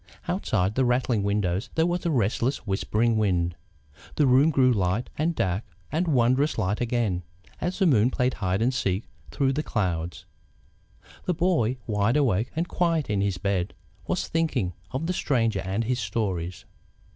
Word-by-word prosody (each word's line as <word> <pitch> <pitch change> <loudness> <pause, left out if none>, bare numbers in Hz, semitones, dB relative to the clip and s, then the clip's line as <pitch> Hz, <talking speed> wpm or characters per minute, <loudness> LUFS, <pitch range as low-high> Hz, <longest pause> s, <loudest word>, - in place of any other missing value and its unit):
Outside 95 +3 0
the 130 - +2
rattling 125 -3 +1
windows 100 -1 0
there 160 - +3
was 175 0 -1
a - - +2
restless, 120 -1 0
whispering 110 +3 +1
wind. 90 -5 +1 0.6
The 150 - +3
room 135 +4 +5
grew 130 -4 +4
light, 95 +3 0
and 160 +3 0
dark, 95 0 0 0.3
and 170 +3 0
wondrous 130 +1 +2
light 105 0 0
again, 115 -7 0 0.4
as 180 +2 -2
the 195 - +3
moon 125 - +4
played 130 -1 0
hide 95 +1 -1
and 130 +3 +2
seek 100 -4 0 0.3
through 135 -1 +1
the 150 - 0
clouds. 90 - -2 1.0
The 180 - 0
boy, 160 -9 +1
wide 105 +3 +1
awake 120 -6 +2
and 165 +2 -1
quiet 165 - 0
in 100 -1 +1
his 100 -2 0
bed, 95 -2 -1 0.3
was - - -1
thinking 140 - 0 0.2
of 135 +5 -3
the 180 - 0
Stranger 115 - +1
and 95 +4 -1
his 125 +2 -1
stories. 95 -4 -3
115 Hz, 165 wpm, -26 LUFS, 100-140 Hz, 1.0 s, room